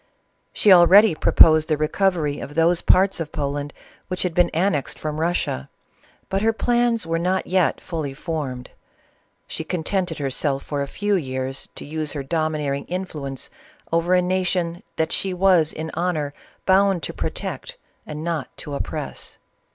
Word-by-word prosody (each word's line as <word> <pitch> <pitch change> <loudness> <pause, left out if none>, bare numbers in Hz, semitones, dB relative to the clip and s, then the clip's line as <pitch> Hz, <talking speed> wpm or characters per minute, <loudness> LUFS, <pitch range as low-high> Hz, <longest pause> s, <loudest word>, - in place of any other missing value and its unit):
She 205 - +5
already 185 +3 +7
proposed 155 0 +5
the 155 - +1
recovery 155 -1 0
of 145 - -8
those 170 +1 +3
parts 190 0 +4
of 160 -2 -4
Poland 145 0 -3 0.4
which 185 -1 -2
had 180 -2 -1
been 175 0 +3
annexed 165 -4 0
from 155 0 -4
Russia; 165 - -1 0.6
but 195 0 -1
her 225 +1 +3
plans 240 -1 +1
were 165 0 -1
not 185 +2 0
yet 185 -2 +1
fully 155 -6 -5
formed; 140 -6 -5 0.7
she - - -5
contented 180 0 -2
herself 140 0 -1
for 145 -1 -3
a 140 - -2
few 205 +7 -1
years 130 -5 -3
to - - -7
use 155 0 -3
her 145 -2 -4
domineer 155 -1 -1
ing 140 - -5
influonc'j 150 -8 -5 0.4
over 170 +2 +3
a 180 - +3
nation 180 -2 -1 0.2
thaLgho 180 +4 0
was 180 -4 +4
in 160 0 -6
honor 160 -5 -1 0.3
bound 190 -2 +3
U> - - -7
protect - - -5 0.3
and 150 +1 -7
not 165 -5 -2
to 145 - -7
oppress. 140 - -5
165 Hz, 155 wpm, -22 LUFS, 150-185 Hz, 0.7 s, already